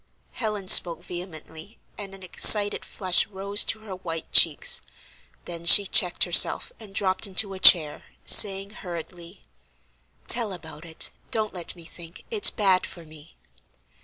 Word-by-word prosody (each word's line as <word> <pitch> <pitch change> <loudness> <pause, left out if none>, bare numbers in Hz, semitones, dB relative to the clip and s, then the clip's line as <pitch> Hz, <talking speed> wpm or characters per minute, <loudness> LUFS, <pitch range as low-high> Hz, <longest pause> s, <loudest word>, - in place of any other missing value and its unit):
Helen 210 -5 -7
spoke 170 -2 +4
vehemently 175 +1 -11 0.2
and 195 -2 -10
an 190 - -13
excited 205 +3 +3
flush 185 -3 -1
rose 200 +1 0
to 220 - -7
her 210 -3 -11
white 165 -3 -9
cheeks; 485 0 +2 0.6
then 170 -1 -10
she 200 +4 +6
checked 180 -2 +1
herself 175 -1 +1
and 205 -4 -15
dropped 190 +1 -2
into 195 +1 -3
a 190 - -11
chair, 155 -5 +3 0.2
saying, 195 -1 +4
hurriedly: 175 -2 -12 0.8
"Tell 225 -5 +1
about 160 -2 -13
it: 160 -1 -3 0.2
don't 215 -2 -3
let 175 -1 -6
me 170 -2 -16
think; 170 +1 -14
it's 430 -2 +3
bad 190 -3 -2
for 170 -3 -14
me." 155 0 -18
185 Hz, 145 wpm, -22 LUFS, 170-205 Hz, 0.8 s, she